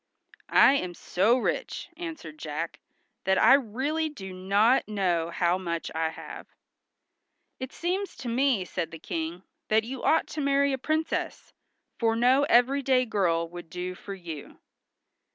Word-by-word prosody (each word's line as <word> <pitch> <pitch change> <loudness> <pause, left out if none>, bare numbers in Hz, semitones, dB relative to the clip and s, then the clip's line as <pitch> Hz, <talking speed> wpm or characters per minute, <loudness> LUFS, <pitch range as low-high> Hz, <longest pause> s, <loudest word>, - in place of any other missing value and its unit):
"I 270 - +8
am 180 -8 -4
so 210 +10 +2
rich," 255 - -2
answered 315 - -7
Jack, 155 +2 -4 0.5
"that 190 0 +3
I - - +7
really 280 +6 +1
do 190 -11 -9
not 200 +7 +3
know 180 -6 0
how 175 +1 +1
much 170 -3 -3
I 160 0 0
have." 160 - -9 1.1
"It 260 0 -5
seems 375 +3 -2
to 250 - -8
me," 240 -4 +2
said 175 -1 -3
the 165 - -9
King, 165 +3 -4 0.2
"that 220 +1 +3
you 255 +3 -6
ought 320 - +3
to 305 - -4
marry 280 0 +2
a 265 - -2
princess, 315 +4 -2 0.5
for 225 -1 +2
no 255 +4 +4
everyday 260 0 +3
girl 175 -7 +1
would 175 -1 -9
do 180 +1 -4
for 195 +2 -8
you." 165 -6 -9
215 Hz, 150 wpm, -27 LUFS, 175-270 Hz, 1.1 s, I